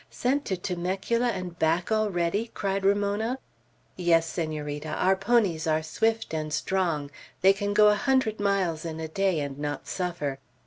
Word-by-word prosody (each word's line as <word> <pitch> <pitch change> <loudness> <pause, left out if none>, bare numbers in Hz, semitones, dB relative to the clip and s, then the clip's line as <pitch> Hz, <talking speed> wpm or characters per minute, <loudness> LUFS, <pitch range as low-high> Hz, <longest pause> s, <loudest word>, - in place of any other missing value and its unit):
"Sent 275 +4 0
to 190 - -1
Temecula 190 +7 -1
and 185 -6 -4
back 165 +5 +1
already!" 210 0 0
cried 195 -1 -1
Ramona. 205 +5 +1 0.6
"Yes, 165 -2 +3
Senorita. 155 -3 -4
Our 190 +4 +2
ponies 195 -6 +1
are 155 0 +1
swift 220 +6 0
and 155 -1 -2
strong. 155 -3 -1 0.3
They 195 +1 +7
can 205 +1 -2
go 210 0 +7
a - - +5
hundred 220 0 +1
miles 195 -6 0
in 160 -1 -5
a 160 - -3
day, 190 0 +1
and 140 -1 -5
not 145 -1 -3
suffer. 170 -7 -3
185 Hz, 160 wpm, -27 LUFS, 160-205 Hz, 0.6 s, They